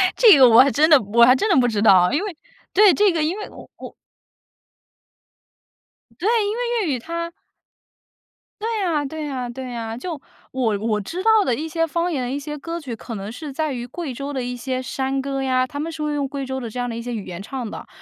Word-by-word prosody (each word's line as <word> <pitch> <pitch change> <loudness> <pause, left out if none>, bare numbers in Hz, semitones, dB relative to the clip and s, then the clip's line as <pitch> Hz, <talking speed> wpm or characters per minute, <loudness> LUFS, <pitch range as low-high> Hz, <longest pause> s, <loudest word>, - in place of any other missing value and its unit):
这 440 -9 +7
个 260 -2 +8
我 235 +1 +8
还 275 - +4
真 300 +4 +4
的 300 -5 +7
我 230 +4 +4
还 255 +2 +6
真 425 +11 0
的 380 - +4
不 245 - +3
知 215 -3 -1
道， 185 -4 +5
因 310 +7 +1
为 405 -5 -5 0.4
对， 405 -1 +6
这 410 -1 +3
个 325 -3 0
因 330 +6 -1
为 420 - -7
我 - - -13
我 - - -10 2.3
对， 365 - -1 0.2
因 415 +2 -2
为 475 -5 -1
粤 290 - 0
语 - - -5
它 335 +5 -5 1.3
对 450 +1 -2
呀 335 -7 0
对 310 +2 -5
呀 255 -4 -4
对 255 +1 -7
呀， 225 -1 -5
就 310 +2 -6 0.3
我 235 -5 0
我 210 0 -1
知 345 - -5
道 440 -1 +5
的 250 - 0
一 310 +6 -4
些 330 +1 0
方 340 +2 -1
言、 255 -3 -2
一 275 - -2
些 295 +1 -6
歌 330 +3 -5
曲 260 -7 -6
可 230 +1 -8
能 200 +1 -6
是 285 +5 -7
在 305 +1 -2
于 240 -1 -5
贵 290 +1 -6
州 275 +3 -5
的 265 -3 -3
一 245 0 -4
些 255 +1 -3
山 265 +1 -2
歌 270 0 -3
呀， 255 -1 +1
他 285 +3 -7
们 320 +3 -3
是 315 -1 -5
会 300 0 -1
用 285 -1 -1
贵 275 0 -5
州 265 0 -4
的 240 -3 -6
这 245 - -6
样 245 - -1
的 235 - -5
一 230 - -5
些 245 +1 -6
语 220 -4 -5
言 175 0 -7
唱 245 +3 -5
的， - - -8
275 Hz, 260 characters per minute, -21 LUFS, 245-330 Hz, 2.3 s, 个